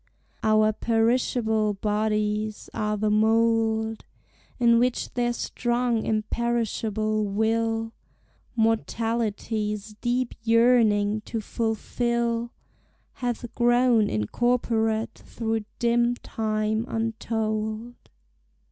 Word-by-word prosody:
Our 215 Hz, 0 st, +3 dB
perishable 225 Hz, -2 st, +1 dB
bodies 210 Hz, +1 st, -1 dB
are 210 Hz, 0 st, -1 dB
the 210 Hz, +1 st, 0 dB
mould 225 Hz, 0 st, +2 dB, 0.6 s
In 235 Hz, -1 st, +5 dB
which 245 Hz, 0 st, 0 dB
their 240 Hz, -1 st, +1 dB
strong 240 Hz, -1 st, -1 dB
imperishable 220 Hz, -1 st, -1 dB
will 225 Hz, +2 st, 0 dB, 0.6 s
Mortality's 220 Hz, -2 st, -1 dB
deep 245 Hz, 0 st, 0 dB
yearning 225 Hz, -3 st, +3 dB
to 230 Hz, -, -3 dB
fulfil 235 Hz, +1 st, -1 dB, 0.6 s
Hath 240 Hz, -1 st, -4 dB
grown 240 Hz, -2 st, +3 dB
incorporate 225 Hz, -, 0 dB
through 225 Hz, -2 st, -3 dB
dim 240 Hz, 0 st, +2 dB
time 215 Hz, -1 st, -2 dB
untold. 220 Hz, 0 st, -2 dB
225 Hz, 75 wpm, -25 LUFS, 215-235 Hz, 0.6 s, In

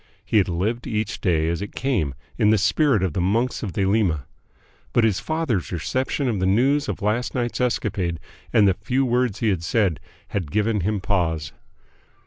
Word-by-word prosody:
He -, -, +2 dB
had 95 Hz, -, +1 dB
lived 105 Hz, +8 st, -1 dB
each 105 Hz, -1 st, -2 dB
day 80 Hz, -5 st, +2 dB
as 85 Hz, +2 st, -1 dB
it 100 Hz, -, -6 dB
came 100 Hz, -, 0 dB, 0.2 s
in 105 Hz, -, +3 dB
the 110 Hz, -, +5 dB
spirit 110 Hz, +2 st, +2 dB
of 90 Hz, -5 st, 0 dB
the 90 Hz, -, -1 dB
Monks 115 Hz, +7 st, 0 dB
of 100 Hz, -6 st, -4 dB
Thelema. 95 Hz, -, +1 dB, 0.7 s
But 120 Hz, -, +4 dB
his 110 Hz, -4 st, +2 dB
father's 155 Hz, -, -1 dB
reception 130 Hz, -, -1 dB
of 110 Hz, -5 st, 0 dB
the 95 Hz, -, +1 dB
news 135 Hz, +8 st, +2 dB
of -, -, -4 dB
last 110 Hz, +4 st, 0 dB
night's 120 Hz, 0 st, -1 dB
escapade 95 Hz, -8 st, -1 dB, 0.3 s
and 105 Hz, -2 st, +5 dB
the 95 Hz, -, +4 dB
few 130 Hz, +7 st, 0 dB
words 120 Hz, -4 st, 0 dB
he 115 Hz, -, +2 dB
had 90 Hz, -5 st, -1 dB
said 95 Hz, -3 st, +1 dB, 0.3 s
had 90 Hz, -7 st, -3 dB
given 105 Hz, +4 st, +1 dB
him 100 Hz, +2 st, -1 dB
pause. 80 Hz, -7 st, -1 dB
105 Hz, 185 wpm, -23 LUFS, 90-120 Hz, 0.7 s, the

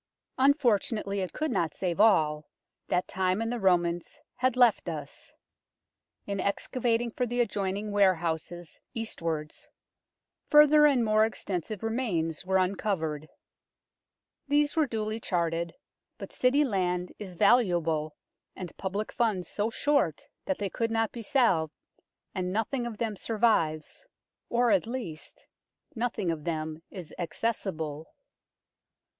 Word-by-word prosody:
Unfortunately 230 Hz, -7 st, +2 dB
it 185 Hz, -1 st, -2 dB
could 310 Hz, -2 st, -2 dB
not 165 Hz, -9 st, 0 dB
save 180 Hz, -1 st, -2 dB
all 155 Hz, -8 st, +3 dB, 0.4 s
that 180 Hz, -, 0 dB
time 185 Hz, +1 st, 0 dB
and 225 Hz, +1 st, -1 dB
the 245 Hz, -, -2 dB
Romans 175 Hz, -3 st, +1 dB, 0.2 s
had 255 Hz, -1 st, +1 dB
left 245 Hz, -3 st, +4 dB
us. -, -, -7 dB, 0.9 s
In 200 Hz, -1 st, -3 dB
excavating 235 Hz, +4 st, 0 dB
for 250 Hz, +2 st, -1 dB
the 245 Hz, +1 st, -2 dB
adjoining 205 Hz, -2 st, -1 dB
warehouses 175 Hz, -4 st, 0 dB
east 225 Hz, -5 st, -4 dB
wards, 155 Hz, -2 st, -4 dB, 0.8 s
further 300 Hz, 0 st, +7 dB
and 260 Hz, -5 st, +3 dB
more 215 Hz, 0 st, +4 dB
extensive 205 Hz, -2 st, -3 dB
remains 205 Hz, -9 st, -1 dB
were 190 Hz, 0 st, +3 dB
uncovered. 180 Hz, -5 st, -1 dB, 1.2 s
These 290 Hz, +1 st, +2 dB
were 315 Hz, -3 st, +3 dB
duly 220 Hz, -1 st, -2 dB
charted, 170 Hz, -4 st, -1 dB, 0.4 s
but -, -, -9 dB
City 265 Hz, +4 st, +3 dB
land 180 Hz, -5 st, -1 dB
is 190 Hz, -4 st, -8 dB
valuable 170 Hz, -8 st, +2 dB, 0.4 s
and 180 Hz, -3 st, -7 dB
public 200 Hz, +3 st, -3 dB
funds 210 Hz, -7 st, 0 dB
so 210 Hz, +2 st, -1 dB
short 280 Hz, -, +1 dB, 0.2 s
that 190 Hz, -, -1 dB
they 200 Hz, -2 st, -3 dB
could 230 Hz, -1 st, -1 dB
not 225 Hz, -1 st, 0 dB
be 235 Hz, -, -7 dB
salved, 215 Hz, -, +2 dB, 0.6 s
and 180 Hz, -1 st, -2 dB
nothing 240 Hz, +4 st, -1 dB
of 225 Hz, -3 st, -7 dB
them 220 Hz, -2 st, -2 dB
survives 210 Hz, -, 0 dB, 0.4 s
or, 240 Hz, 0 st, +3 dB
at 200 Hz, +1 st, +3 dB
least, 225 Hz, -11 st, -7 dB, 0.5 s
nothing 225 Hz, -6 st, -1 dB
of 155 Hz, -2 st, -5 dB
them 155 Hz, -1 st, -3 dB
is 175 Hz, -5 st, -9 dB
acces 205 Hz, +4 st, -1 dB
sible. 155 Hz, -1 st, -5 dB
200 Hz, 130 wpm, -28 LUFS, 170-235 Hz, 1.2 s, further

